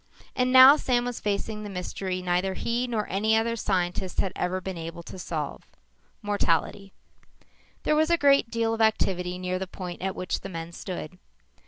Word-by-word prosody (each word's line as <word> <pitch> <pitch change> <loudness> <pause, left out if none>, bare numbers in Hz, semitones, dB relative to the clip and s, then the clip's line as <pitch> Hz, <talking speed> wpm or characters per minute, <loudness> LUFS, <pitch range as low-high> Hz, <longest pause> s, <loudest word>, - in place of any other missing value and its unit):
And 250 0 +1
now, 260 +3 +10
Sam 245 -4 +1
was 245 -1 -4
facing 210 +1 -2
the 210 - -6
mystery 185 0 -4
neither 180 +1 0
he 240 +4 -1
nor 220 -4 -2
any 215 +4 +2
other 230 +1 0
scientist 185 -3 -1
had 190 - 0
ever 185 +1 -1
been 190 0 -5
able 165 +1 -7
to 185 - -10
solve. 155 -5 -5 0.6
Mortality. 195 -1 0 0.9
There 305 - +2
was 315 +1 +3
a 340 - +4
great 280 -5 +4
deal 230 -1 0
of 225 - -2
activity 180 -5 +1
near 185 0 -2
the 190 - -4
point 180 -2 -7
at 190 0 -2
which 180 - -2
the 195 - -8
men 165 -2 -6
stood. 180 -1 -7
195 Hz, 180 wpm, -26 LUFS, 180-230 Hz, 0.9 s, now